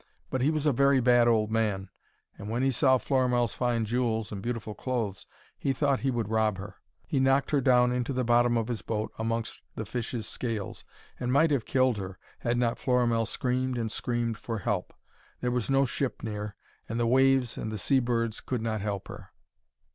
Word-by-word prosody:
But 130 - 0
he 135 - +3
was 155 -1 -1
a 150 - +5
very 140 +2 +4
bad 120 -1 +5
old 110 -2 +2
man, 105 -4 0 0.4
and 100 +1 -8
when 120 +3 0
he 135 - +3
saw 130 +1 +4
Florimell's 125 -4 +1
fine 120 -3 0
jewels 115 -1 -1
and 100 -2 -5
beautiful 115 -1 -4
clothes 115 -5 -3 0.3
he 135 - 0
thought 140 0 +1
he 135 - 0
would 120 -5 -1
rob 110 -2 +1
her. 100 +1 -8 0.3
He 135 - 0
knocked 135 +1 +3
her 145 -2 +3
down 125 -1 +4
into 125 +1 -1
the 130 -1 0
bottom 120 0 +3
of 115 -1 -1
his 120 -3 -3
boat 110 -1 -3
amongst 115 0 -2
the 110 - -4
fishes' 115 0 -4
scales, 115 -6 -4 0.4
and 125 0 -1
might 150 +4 +4
have 135 -6 +1
killed 130 -3 +2
her, 95 -1 -6 0.2
had 120 0 0
not 120 -1 +1
Florimell 120 -3 +2
screamed 130 0 -1
and 115 -2 -2
screamed 120 -2 -1
for 115 -1 -4
help. 100 -4 -2 0.5
There 125 - -1
was 125 -1 -1
no 135 0 +4
ship 130 +1 -3
near, 105 -2 -4 0.3
and 115 +2 -2
the 120 - +2
waves 130 0 +3
and 110 - -4
the 110 - -3
sea 135 +7 +3
birds 115 -2 -1
could 125 -4 -3
not 110 -2 -1
help 100 -2 -3
her. - - -10
120 Hz, 200 wpm, -28 LUFS, 110-130 Hz, 0.5 s, a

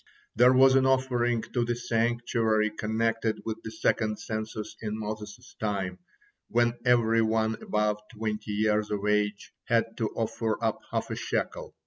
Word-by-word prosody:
There 125 +3 +6
was 130 +1 +6
an 130 0 +4
offering 120 -3 +1
to 120 - +2
the 120 0 -1
sanctuary 115 -2 +1
connected 110 +1 -1
with 110 -1 -4
the - - -6
second 110 0 0
census 110 0 -5
in 105 -1 -3
Moses' 105 +2 -7
time, 100 -4 -2 0.5
when 120 0 +2
every 115 -2 +4
one 110 0 +1
above 105 0 0
twenty 110 -1 -4
years 105 0 +1
of 105 -1 -2
age 105 0 0
had 115 -1 +1
to 110 -2 0
offer 115 -1 -1
up 110 - 0
half - - -2
a - - -2
shekel. - - -3
110 Hz, 150 wpm, -28 LUFS, 105-120 Hz, 0.5 s, There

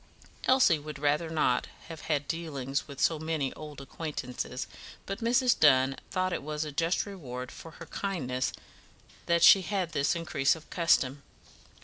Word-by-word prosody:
Elsie 255 - +5
would 150 0 -8
rather 150 +3 +1
not 150 -6 +1 0.2
have 165 -2 -8
had 145 -2 0
dealings 140 -5 -3
with 140 -2 -10
so 160 -2 +2
many 155 -4 -2
old 150 -2 -9
acquaintances, 135 -3 -5 0.4
but 195 +2 -4
Mrs. 245 +2 +3
Dunn 135 -2 +5
thought 185 -1 0
it - - -2
was 150 +1 -3
a 150 - -5
just 165 +5 0
reward 130 -11 -7
for 165 - -10
her 170 - -9
kindness 135 -11 -2 0.8
that 170 0 +3
she 195 - +9
had 185 -3 -2
this 140 +1 +1
increase 165 -4 +1
of 160 - -13
custom. 145 -5 +2
155 Hz, 155 wpm, -29 LUFS, 140-170 Hz, 0.8 s, she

